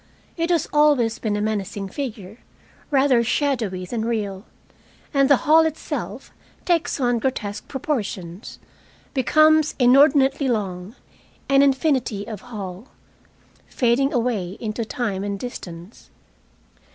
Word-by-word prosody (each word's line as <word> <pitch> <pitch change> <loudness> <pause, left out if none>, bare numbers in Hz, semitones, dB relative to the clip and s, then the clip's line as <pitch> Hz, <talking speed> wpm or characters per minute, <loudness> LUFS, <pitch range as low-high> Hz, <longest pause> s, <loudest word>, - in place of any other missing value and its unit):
It 335 0 -1
has 340 -4 +1
always 285 -7 +3
been 215 -2 -1
a 205 - -1
menacing 205 -2 -3
figure, 220 -4 -6 0.5
rather 265 -4 +3
shadowy 230 -8 -1
than 220 +4 -3
real. 210 -3 -3 0.7
And 275 -1 +3
the 280 - +6
hail 310 +5 +5
itself 320 -1 -3 0.3
takes 340 -5 0
on 245 -2 +1
grotesque 215 -4 -3
proportions, 210 - -4 0.6
becomes 310 +3 +4
inordinately 275 +2 +4
long, 200 -3 -3 0.5
an 275 0 +5
infinity 265 -7 +1
of 220 -3 -7
hall, 210 -3 -8 0.8
fading 260 +2 +1
away 225 -6 -1
into 225 0 -3
time 210 -5 -3
and 200 -1 -3
distance. 180 -5 -9
240 Hz, 115 wpm, -22 LUFS, 205-275 Hz, 0.8 s, the